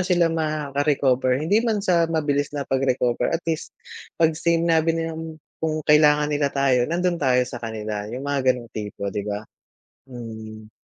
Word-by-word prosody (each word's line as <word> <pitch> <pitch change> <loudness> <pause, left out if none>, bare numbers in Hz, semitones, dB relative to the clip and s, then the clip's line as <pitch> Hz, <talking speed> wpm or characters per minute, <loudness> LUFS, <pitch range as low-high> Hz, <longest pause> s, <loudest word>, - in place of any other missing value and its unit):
sila 175 -2 +2
makaka-recover. 145 -4 +1
Hindi 165 +10 +2
man 220 -4 -1
sa 170 -3 +3
mabilis 145 -2 -1
na 140 - -2
pag-recover, 130 -2 0
at 165 +1 -2
least 165 -1 -3 0.4
pag 160 -1 +3
sinabi 165 0 +2
nilang 160 -1 -4 0.2
kung 155 -1 -2
kailangan 150 -1 +4
nila 145 -1 +1
tayo, 135 -2 +2
nandun 175 0 0
tayo 125 -2 +3
sa 120 -1 -8
kanila. 110 -2 -4
'Yung 125 +5 -6
mga 140 -2 0
ganong 120 -3 0
tipo, 105 -2 -5
'di 105 - -2
ba. 105 +1 -3 0.6
Mm. 110 -3 -9
145 Hz, 155 wpm, -23 LUFS, 125-165 Hz, 0.6 s, kailangan